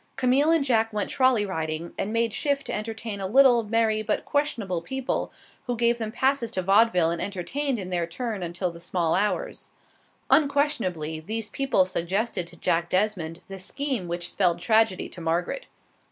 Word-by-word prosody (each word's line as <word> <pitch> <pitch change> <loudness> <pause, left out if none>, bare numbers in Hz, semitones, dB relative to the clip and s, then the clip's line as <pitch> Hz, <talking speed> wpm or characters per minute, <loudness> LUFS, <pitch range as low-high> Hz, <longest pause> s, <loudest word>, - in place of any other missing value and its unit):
Camille 265 +4 +3
and 325 -4 +3
Jack 225 -3 +2
went 210 -2 -2
trolley 255 -5 +3
riding, 160 -2 -4
and 210 - -3
made 230 -1 +1
shift 280 +3 0
to - - -4
entertain 220 -1 -4
a 190 - -2
little, 250 +2 +6
merry 220 0 +1
but 215 0 -1
questionable 225 - -1
people, 265 +8 -3 0.4
who 245 -1 -1
gave 235 +1 +2
them 220 -1 -3
passes 260 0 +1
to 185 -4 -2
vaudeville 195 -3 +4
and 170 - -2
entertained 245 +8 -2
in 185 -3 -5
their 175 -2 -1
turn 220 +2 -4
until 175 +1 -2
the 170 - -11
small 170 -1 0
hours. 210 - -1 0.6
Unquestionably 230 - +1
these 220 +6 -3
people 270 -9 +2
suggested 185 +1 -1
to 170 - -8
Jack 170 +1 0
Desmond 185 -4 -1
the 195 0 -8
scheme 255 0 -3
which 175 0 -2
spelled 175 -3 +2
tragedy 220 -2 +2
to 175 - -10
Margaret. 170 - -2
210 Hz, 170 wpm, -26 LUFS, 175-245 Hz, 0.6 s, little